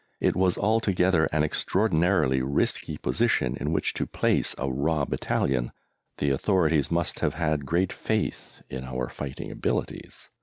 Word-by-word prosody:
It - - +1
was 90 -1 +2
altogether 95 -6 +2
an 75 0 0
extraordinarily 85 -5 +2
risky 70 +3 0
position 65 0 +1
in 75 - -2
which 80 - 0
to - - -2
place - - 0
a 70 - -2
raw 70 +3 0
battalion. 60 -2 -1 0.5
The 70 - +1
authorities 80 -1 +2
must 85 0 0
have - - 0
had 75 -4 -1
great 90 +3 +1
faith - - -2
in 65 0 -6
our 65 -1 -3
fighting 70 -3 -6
abilities. - - -4
75 Hz, 145 wpm, -26 LUFS, 65-90 Hz, 0.5 s, was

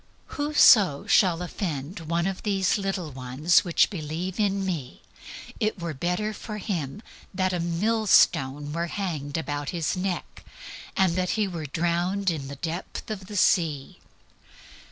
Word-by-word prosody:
"Whoso 245 - +5
shall 180 -3 +3
offend 165 -2 -4
one 170 +1 -1
of 195 -1 -3
these 195 -1 +1
little 190 -5 -3
ones, 135 +8 +2
which 175 +2 +2
believe 170 +2 -4
in 200 -2 +1
me, 155 -9 -4 0.6
it 215 -2 0
were 170 -2 -4
better 180 +9 -1
for 215 0 -7
him 190 - -4 0.3
that 185 0 +1
a 180 - -1
millstone 170 -7 +2
were 170 +1 -1
hanged 160 -7 -3
about 145 -2 -3
his 165 -4 -1
neck, 185 -1 -4 0.5
and 190 -4 +3
that 185 -1 0
he 210 -2 +1
were 165 -5 -5
drowned 175 +5 0
in 145 -5 -5
the 140 - -7
depth 165 +8 -5
of 190 -3 -6
the 205 - -5
sea." 155 -8 +1
175 Hz, 145 wpm, -26 LUFS, 155-195 Hz, 0.6 s, Whoso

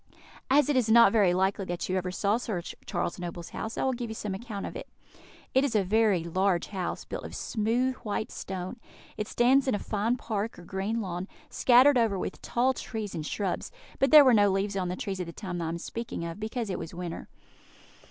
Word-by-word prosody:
As 285 +2 +5
it 295 - +1
is 245 -4 +2
not 230 -3 +7
likely 190 -1 +2
that 175 -1 -3
you 185 - -1
ever 185 -1 -1
saw 200 +4 +1
Sir 220 -6 -3 0.3
Charles 175 -1 -2
Noble's 175 -1 -6
house, 220 - -5
I - - 0
will 265 - +1
give 240 -1 -4
you 220 - -5
some 210 -2 -4
account 205 0 -5
of - - -7
it. - - -7 0.6
It 265 - +4
is 265 -5 0
a 205 - +4
very 205 -2 +2
large 185 +1 0
house, 190 -3 -4
built - - -6
of - - -7
smooth 235 +4 0
white 215 -1 -3
stone; 185 +4 -5 0.4
it 210 0 -3
stands 260 +3 +3
in 260 - +2
a - - 0
fine 215 +4 -1
park, 220 -2 -3
or 175 - -11
green 195 +6 -2
lawn, 180 -1 -4 0.2
scattered 255 +2 +6
over 220 -4 +2
with - - -5
tall 255 +2 +1
trees 220 -5 -5
and 160 - -4
shrubs; 195 -4 -2 0.3
but 270 - +3
there 300 0 +9
were 255 - +6
no 205 -2 +5
leaves 195 +1 0
on 185 -2 -1
the 180 - -2
trees 190 0 -4
at 180 - -3
the 170 - -7
time 180 -3 -5
I 165 - -2
am 170 - -3
speaking 225 -1 -5
of, 170 +4 -6
because 220 0 -3
it - - -3
was 165 +1 -7
winter. 175 -1 -6
205 Hz, 220 wpm, -28 LUFS, 185-235 Hz, 0.6 s, there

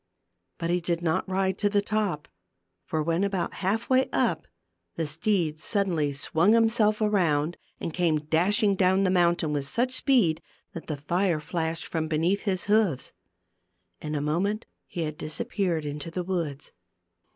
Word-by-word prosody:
But 170 0 -2
he 180 0 +1
did 170 0 -2
not 165 +3 0
ride 190 0 0
to 205 - +2
the 205 0 +2
top; 205 -8 -1 0.6
for 155 -1 -1
when 165 +4 0
about 195 -3 -1
half 210 +5 0
way 260 0 +3
up, - - 0 0.5
the 165 - -1
steed 160 0 0
suddenly 170 -7 +1
swung 160 +8 +2
himself 225 -2 +3
around 175 -7 +2 0.2
and 165 - -4
came 170 -3 +2
dashing 200 +6 +2
down 190 +1 +3
the 185 - +2
mountain 170 -4 +2
with 145 -2 -1
such 250 - 0
speed 230 - +2 0.3
that 165 - -8
the 150 - -3
fire 170 +3 0
flashed 165 +1 -3
from 160 -1 -2
beneath 165 +5 +1
his 185 -2 0
hoofs. 205 - +1 0.9
In 150 0 -4
a 145 - -1
moment 185 +9 -1 0.2
he 170 - -4
had 155 -1 -5
disappeared 165 +1 -2
into 145 +2 -5
the 180 +2 -3
woods. 165 -6 -3
175 Hz, 160 wpm, -27 LUFS, 155-200 Hz, 0.9 s, way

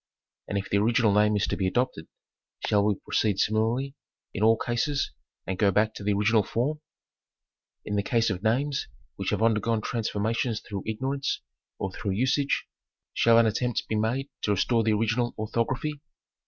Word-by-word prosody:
And 100 - -2
if 100 - -3
the 100 - +1
original 115 0 +3
name 105 +1 +4
is 105 - +2
to - - -1
be 95 - 0
adopted, 95 -7 -1 0.6
shall 105 -1 +3
we 105 0 +2
proceed 100 +1 0
similarly 115 +7 +1 0.4
in - - -4
all 110 +1 +5
cases 130 +5 -1 0.3
and 95 0 -4
go 100 - +4
back 105 +3 +2
to 105 - -8
the 105 0 +2
original 105 +2 +3
form? 135 +9 -2 1.0
In 105 - -2
the - - +3
case 115 0 +1
of 95 -1 -4
names 135 +6 0 0.3
which - - -3
have - - 0
undergone 115 0 +2
transformations 115 +1 -1
through 100 -2 -7
ignorance 135 +5 -2 0.4
or 95 - -3
through 100 +1 -3
usage, 130 +6 +1 0.5
shall 115 0 +5
an 115 - +6
attempt 115 +2 -1
be 110 - -1
made 115 +6 0
to - - -1
restore 115 +4 +2
the 110 0 +2
original 115 +3 0
orthography 125 +7 -2
110 Hz, 170 wpm, -27 LUFS, 105-120 Hz, 1.0 s, an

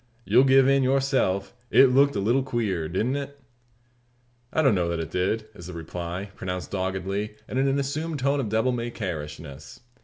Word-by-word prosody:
You'll 130 - +5
give 135 0 +6
in, 135 0 +4
yourself, 130 -8 +1 0.2
it 130 -1 +6
looked 140 +2 +4
a - - 0
leetle 120 +7 +2
queer; 105 -11 -2
didn't 115 - 0
it?" 140 0 -7 1.1
"I 160 - +1
don't 135 -5 +5
know 90 -3 0
that 85 -1 -2
it 80 0 -5
did," 100 +5 0
is 90 -5 -11
the 90 - -7
reply, 85 +3 -6
pronounced 90 -5 -5
doggedly, 95 +2 -2
and 130 - -2
in 135 - +2
an 135 +1 +1
assumed 150 +3 -2
tone 140 +1 +1
of 120 -6 -2
devil 110 +4 +1
may 120 -1 -2
care 90 -9 -4
ishness. 75 - -10
110 Hz, 190 wpm, -25 LUFS, 90-135 Hz, 1.1 s, give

